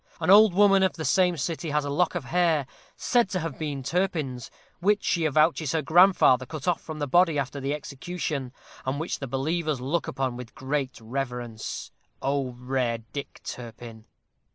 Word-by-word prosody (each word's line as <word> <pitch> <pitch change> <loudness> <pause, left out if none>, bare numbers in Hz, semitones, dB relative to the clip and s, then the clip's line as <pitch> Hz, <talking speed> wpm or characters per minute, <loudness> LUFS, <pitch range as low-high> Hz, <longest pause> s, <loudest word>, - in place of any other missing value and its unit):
An 165 +2 +2
old 210 -2 +7
woman 195 -1 +5
of 190 -1 +2
the 160 -1 -5
same 180 +4 +3
city 165 +2 -3
has 150 0 0
a - - -3
lock 175 +5 +1
of - - -3
hair, 165 -5 +2 0.3
said 240 -5 +2
to 185 - -1
have 160 -4 -5
been 145 -4 -3
Turpin's, 155 -7 -2 0.3
which 205 +3 +2
she 170 -2 +1
avouches 155 0 +2
her 160 -2 0
grandfather 160 -6 +5
cut 155 -1 -7
off 175 - +1
from 155 -1 -7
the 145 - -1
body 165 +2 +4
after 140 0 -2
the 140 +2 -1
execution, 145 -2 -4 0.3
and 130 +2 -2
which 160 - -3
the 135 - -5
believers 155 +3 -1
look 145 +7 -1
upon 130 -2 -2
with 125 -2 -10
great 135 -1 -3
reverence. 120 -1 -5 0.3
O 135 -2 -1
rare 125 -1 -1 0.2
Dick 140 -1 -7
Turpin! 115 -2 -9
150 Hz, 175 wpm, -26 LUFS, 130-170 Hz, 0.3 s, old